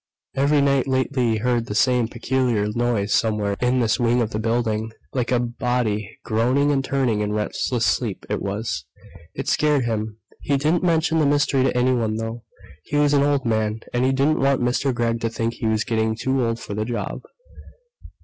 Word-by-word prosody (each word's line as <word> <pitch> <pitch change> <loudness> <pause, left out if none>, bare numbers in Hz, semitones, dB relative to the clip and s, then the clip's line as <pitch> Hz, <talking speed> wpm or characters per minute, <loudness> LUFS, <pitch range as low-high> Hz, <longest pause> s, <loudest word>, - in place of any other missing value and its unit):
Every 140 +2 +3
night 140 -1 +2
lately 130 -2 +1
he - - 0
heard 120 +1 0
the 105 - -4
same 125 +1 +3
peculiar 120 -2 0
noise 115 -4 0
somewhere 105 -3 +1
in 125 +1 +2
this 115 +1 +1
wing 120 0 +2
of 115 -2 -1
the 110 - -2
building.... 110 -1 -1 0.2
Like 125 -2 -1
a 125 - +4
body 120 -3 -2
groaning 125 +6 +2
and 135 -2 +1
turning 130 -6 0
in 105 0 -1
restless 115 +3 -1
sleep, 105 -1 -1
it 105 - -2
was. 100 -6 -3 0.5
It 135 - -5
scared 150 -4 +2
him. 110 -2 -3 0.2
He 140 - 0
didn't 155 +5 +1
mention 165 -2 +2
the 150 - +3
mystery 145 -1 +2
to 130 - 0
anyone, 125 -3 +1
though. 115 +1 -4 0.4
He - - -4
was 145 0 +3
an 140 - +4
old 140 -2 +1
man, 110 -1 0
and 120 +1 +1
he 130 - +3
didn't 140 +4 +2
want 135 0 +2
Mr. 125 +3 +1
Gregg 115 -1 -1
to 115 - 0
think 115 0 -2
he 115 - -3
was 110 0 +1
getting 110 -1 0
too 130 +2 0
old 115 0 -1
for 105 - -7
the 105 +1 -1
job. 120 +1 -4
120 Hz, 195 wpm, -22 LUFS, 110-135 Hz, 0.5 s, a